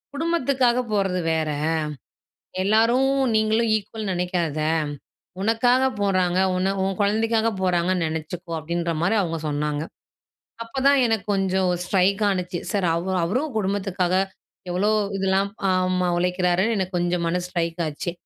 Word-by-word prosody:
குடும்பத்துகாக 275 Hz, -6 st, +1 dB
போறது 195 Hz, -3 st, +1 dB
வேற. 160 Hz, -1 st, 0 dB, 1.1 s
எல்லாரும், 230 Hz, +6 st, +3 dB, 0.3 s
நீங்களும் 220 Hz, +1 st, +2 dB
ஈக்வல்ன்னு 215 Hz, -1 st, -5 dB
நெனைக்காத. 175 Hz, -4 st, -1 dB, 0.8 s
உனக்காக 245 Hz, +4 st, +3 dB, 0.2 s
போறாங்க, 185 Hz, -3 st, +1 dB, 0.2 s
உன்ன 185 Hz, +1 st, +1 dB
உன் 190 Hz, -1 st, -1 dB
குழந்தைக்காக 225 Hz, +2 st, +2 dB
போறாங்கன்னு 180 Hz, -1 st, +1 dB
நெனைச்சுக்கோ." 165 Hz, +2 st, -6 dB
அப்படின்ற 170 Hz, +2 st, -2 dB
மாரி 190 Hz, +6 st, +2 dB
அவுங்க 165 Hz, -4 st, -2 dB
சொன்னாங்க. 150 Hz, 0 st, -1 dB, 0.8 s
அப்ப 245 Hz, +4 st, -5 dB
தான் 280 Hz, -1 st, +5 dB
எனக்கு 225 Hz, -3 st, 0 dB
கொஞ்சம் 190 Hz, -1 st, +1 dB
ஸ்ட்ரைக் 195 Hz, +2 st, +1 dB
ஆனுச்சு. 180 Hz, -2 st, -2 dB
சரி 200 Hz, -5 st, +1 dB
அவ் 170 Hz, +3 st, -3 dB
அவரும் 255 Hz, -, -1 dB
குடும்பத்துக்காக 190 Hz, -3 st, 0 dB, 0.6 s
எவ்வளோ 190 Hz, +4 st, +1 dB, 0.3 s
இதெல்லாம் 195 Hz, +1 st, +1 dB, 0.2 s
ஆமா. 185 Hz, 0 st, +1 dB
உழைக்கிறாருன்னு 180 Hz, +4 st, +1 dB
எனக்கு 185 Hz, -1 st, -2 dB
கொஞ்சம் 175 Hz, 0 st, 0 dB
மனசு 175 Hz, +1 st, -1 dB
ஸ்ட்ரைக் 170 Hz, -1 st, -2 dB
ஆச்சு. 155 Hz, +3 st, -4 dB
190 Hz, 120 wpm, -23 LUFS, 175-215 Hz, 1.1 s, தான்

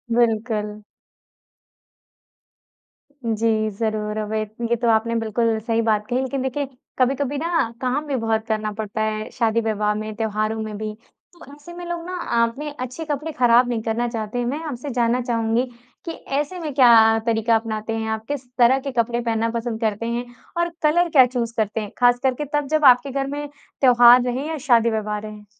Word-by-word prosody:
बिल्कुल। 220 Hz, -2 st, 0 dB, 2.5 s
जी। 220 Hz, -1 st, +1 dB
ज़रूर 215 Hz, -1 st, -2 dB
अवैत 215 Hz, 0 st, -3 dB, 0.2 s
ये 235 Hz, -, +3 dB
तो 235 Hz, +1 st, -2 dB
आपने 225 Hz, +1 st, +2 dB
बिल्कुल 225 Hz, 0 st, 0 dB
सही 225 Hz, +1 st, 0 dB
बात 215 Hz, -2 st, +1 dB
कही। 250 Hz, +1 st, 0 dB
लेकिन 265 Hz, 0 st, -2 dB
देखिए 265 Hz, +2 st, -2 dB, 0.3 s
कभी-कभी 275 Hz, +2 st, +1 dB
ना 330 Hz, -4 st, 0 dB
काम 265 Hz, +4 st, -1 dB
भी 280 Hz, -, -1 dB
बहुत 225 Hz, -2 st, -1 dB
करना 215 Hz, -1 st, -1 dB
पड़ता 215 Hz, 0 st, -4 dB
है, 215 Hz, 0 st, -2 dB
शादी-विवाह 220 Hz, -2 st, 0 dB
में, 215 Hz, 0 st, -4 dB
त्योहारों 215 Hz, 0 st, -1 dB
में 215 Hz, -1 st, -5 dB
भी। 215 Hz, 0 st, -4 dB, 0.4 s
तो 345 Hz, -, -14 dB
ऐसे 295 Hz, +4 st, -12 dB
में 350 Hz, 0 st, -8 dB
लोग 345 Hz, -1 st, -4 dB
ना 365 Hz, +1 st, -5 dB
अ, 235 Hz, -9 st, +1 dB
अपने 290 Hz, +6 st, -6 dB
अच्छे 255 Hz, +6 st, -5 dB
कपड़े 300 Hz, +1 st, -3 dB
खराब 245 Hz, -3 st, +4 dB
नहीं 235 Hz, -2 st, -1 dB
करना 230 Hz, +2 st, -1 dB
चाहते 225 Hz, 0 st, -4 dB
हैं। 245 Hz, -, -1 dB
मैं 270 Hz, +5 st, -2 dB
आपसे 285 Hz, -2 st, -5 dB
जानना 240 Hz, -1 st, +1 dB
चाहूँगी 230 Hz, 0 st, 0 dB, 0.4 s
कि 335 Hz, -, -3 dB, 0.3 s
ऐसे 300 Hz, +6 st, -2 dB
में 310 Hz, -4 st, -4 dB
क्या 230 Hz, -4 st, +6 dB
तरीक़ा 225 Hz, 0 st, +2 dB
अपनाते 220 Hz, 0 st, -2 dB
हैं 220 Hz, 0 st, -3 dB
आप? 220 Hz, 0 st, -3 dB
किस 280 Hz, -3 st, -4 dB
तरह 250 Hz, +2 st, +5 dB
के 275 Hz, +1 st, -5 dB
कपड़े 235 Hz, -1 st, 0 dB
पहनना 230 Hz, -1 st, 0 dB
पसंद 230 Hz, -1 st, -4 dB
करते 220 Hz, 0 st, -1 dB
हैं 235 Hz, +1 st, -2 dB, 0.3 s
और 345 Hz, 0 st, +1 dB
कलर 340 Hz, +3 st, +3 dB
क्या 270 Hz, -5 st, +7 dB
चूज़ 240 Hz, -2 st, -3 dB
करते 220 Hz, 0 st, 0 dB
हैं? 210 Hz, -, -7 dB
ख़ासकर 245 Hz, +1 st, +3 dB
के 295 Hz, +4 st, -4 dB
तब 295 Hz, -1 st, 0 dB
जब 310 Hz, +1 st, +1 dB
आपके 255 Hz, +1 st, +6 dB
घर 270 Hz, 0 st, -2 dB
में 290 Hz, +1 st, -4 dB, 0.3 s
त्योहार 245 Hz, -1 st, +7 dB
रहें 250 Hz, +3 st, -2 dB
या 320 Hz, 0 st, -3 dB
शादी-विवाह 220 Hz, -3 st, +2 dB
रहें। 210 Hz, 0 st, -10 dB
235 Hz, 185 wpm, -22 LUFS, 220-265 Hz, 2.5 s, क्या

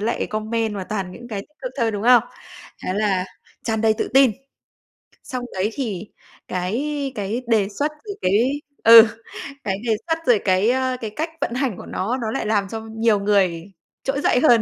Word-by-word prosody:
lại 225 Hz, +3 st, -1 dB
comment 220 Hz, 0 st, -2 dB
và 195 Hz, -2 st, -4 dB
toàn 190 Hz, -2 st, -4 dB
những 240 Hz, +5 st, -11 dB
cái 210 Hz, -4 st, -4 dB
tích 300 Hz, +10 st, -17 dB
cực -, -, -4 dB
thôi, 230 Hz, -2 st, +2 dB
đúng 205 Hz, -2 st, -4 dB
không? 245 Hz, 0 st, +6 dB, 0.6 s
Thế -, -, -1 dB
là 200 Hz, -3 st, +1 dB, 0.4 s
tràn 220 Hz, -1 st, -1 dB
đầy 220 Hz, 0 st, +3 dB
tự -, -, -1 dB
tin. 270 Hz, -2 st, +7 dB, 0.9 s
Xong 255 Hz, -2 st, -5 dB
đấy 190 Hz, +3 st, 0 dB
thì 215 Hz, -7 st, -4 dB, 0.4 s
cái 270 Hz, +10 st, -2 dB
cái 210 Hz, +4 st, -2 dB
đề 215 Hz, -4 st, +2 dB
xuất 285 Hz, +9 st, -2 dB, 0.2 s
thì -, -, -3 dB
cái 235 Hz, +10 st, +2 dB, 0.2 s
ừ, 230 Hz, 0 st, +10 dB, 0.6 s
cái 195 Hz, -1 st, -1 dB
đề 235 Hz, -, 0 dB, 0.2 s
xuất 325 Hz, -1 st, +1 dB
rồi 240 Hz, -4 st, +5 dB
cái, 190 Hz, +3 st, +3 dB
ờ, 260 Hz, 0 st, +1 dB
cái 220 Hz, -, -3 dB
cách 315 Hz, +2 st, -2 dB
vận -, -, -1 dB
hành 250 Hz, -5 st, -1 dB
của -, -, -9 dB
nó, 225 Hz, +7 st, -2 dB
nó 220 Hz, -1 st, -2 dB
lại 270 Hz, -, -2 dB
làm 205 Hz, -2 st, +1 dB
cho 225 Hz, +2 st, -5 dB
nhiều 225 Hz, -1 st, +1 dB
người 190 Hz, -5 st, +1 dB, 0.4 s
trỗi 275 Hz, +1 st, -1 dB
dậy 250 Hz, -, +3 dB
hơn, 240 Hz, -5 st, +5 dB
225 Hz, 195 wpm, -22 LUFS, 200-250 Hz, 0.9 s, ừ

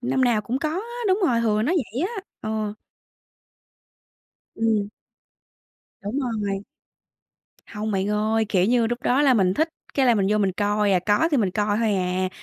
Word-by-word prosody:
năm 260 Hz, +1 st, +1 dB
nào 235 Hz, -3 st, +2 dB
cũng 235 Hz, +5 st, -3 dB
có 310 Hz, -, -1 dB
á. 390 Hz, +9 st, -4 dB, 0.2 s
Đúng 380 Hz, +2 st, +2 dB
rồi, 235 Hz, -5 st, +2 dB
hừ 215 Hz, -2 st, +1 dB
nó 300 Hz, -, +1 dB
vậy 270 Hz, -, -1 dB
á. 455 Hz, -3 st, -5 dB, 0.2 s
Ờ. 215 Hz, -1 st, -3 dB, 1.8 s
Ừm. 220 Hz, -3 st, +1 dB, 1.1 s
Đúng 205 Hz, +7 st, -3 dB
rồi. 205 Hz, -6 st, -2 dB, 1.0 s
Hông 215 Hz, +1 st, -4 dB
bạn 195 Hz, 0 st, 0 dB
ơi, 215 Hz, +1 st, +1 dB
kiểu 185 Hz, -4 st, +2 dB
như, 235 Hz, +2 st, +3 dB
lúc 240 Hz, +2 st, -3 dB
đó 265 Hz, +4 st, +2 dB
là 270 Hz, -3 st, +5 dB
mình 190 Hz, -3 st, +2 dB
thích 315 Hz, +7 st, +1 dB, 0.3 s
cái 270 Hz, -2 st, +3 dB
là 240 Hz, -, +5 dB
mình 200 Hz, -3 st, +1 dB
vô 210 Hz, -, +2 dB
mình 195 Hz, -2 st, +1 dB
coi 205 Hz, +1 st, +1 dB
à, 185 Hz, -, +4 dB
có 210 Hz, +11 st, +3 dB
thì 295 Hz, -, +2 dB
mình 205 Hz, -7 st, +1 dB
coi 205 Hz, +2 st, 0 dB
hôi 220 Hz, -3 st, +1 dB
à, 185 Hz, 0 st, 0 dB
220 Hz, 185 wpm, -23 LUFS, 205-250 Hz, 1.8 s, là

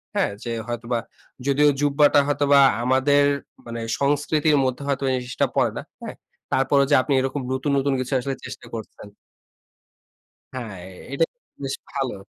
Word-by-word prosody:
হ্যাঁ? -, -, +1 dB
যে 120 Hz, -, -4 dB, 0.2 s
হয়তোবা, 120 Hz, 0 st, -2 dB, 0.5 s
যদিও 145 Hz, +2 st, +4 dB
জুব্বাটা 145 Hz, 0 st, +4 dB
হয়তোবা 145 Hz, -1 st, +4 dB, 0.2 s
আমাদের 135 Hz, +3 st, +3 dB, 0.4 s
মানে 115 Hz, 0 st, -6 dB, 0.2 s
সংস্কৃতির 145 Hz, +1 st, +2 dB
মধ্যে 130 Hz, +2 st, -2 dB
হয়তো 140 Hz, -1 st, -1 dB
এই -, -, +1 dB
জিনিসটা 125 Hz, -, -1 dB
পড়ে -, -, +2 dB
না। -, -, -3 dB, 0.2 s
হ্যাঁ? -, -, -6 dB, 0.4 s
তারপরেও 140 Hz, +1 st, +3 dB
যে -, -, +7 dB
আপনি 135 Hz, +2 st, -1 dB
এরকম 135 Hz, +1 st, -2 dB
নতুন, 135 Hz, +2 st, -1 dB
নতুন 135 Hz, 0 st, +1 dB
কিছু 130 Hz, +2 st, -3 dB
আসলে 135 Hz, +1 st, -3 dB
চেষ্টা 130 Hz, +1 st, -9 dB
করছেন 105 Hz, -1 st, -9 dB, 1.4 s
হ্যাঁ, 110 Hz, -8 st, -6 dB, 0.3 s
এটা 140 Hz, +4 st, +1 dB
কিন্তু 245 Hz, -, -57 dB
বেশ 135 Hz, -, -2 dB, 0.2 s
ভালো। 135 Hz, -3 st, -2 dB
135 Hz, 150 wpm, -23 LUFS, 125-145 Hz, 1.4 s, যে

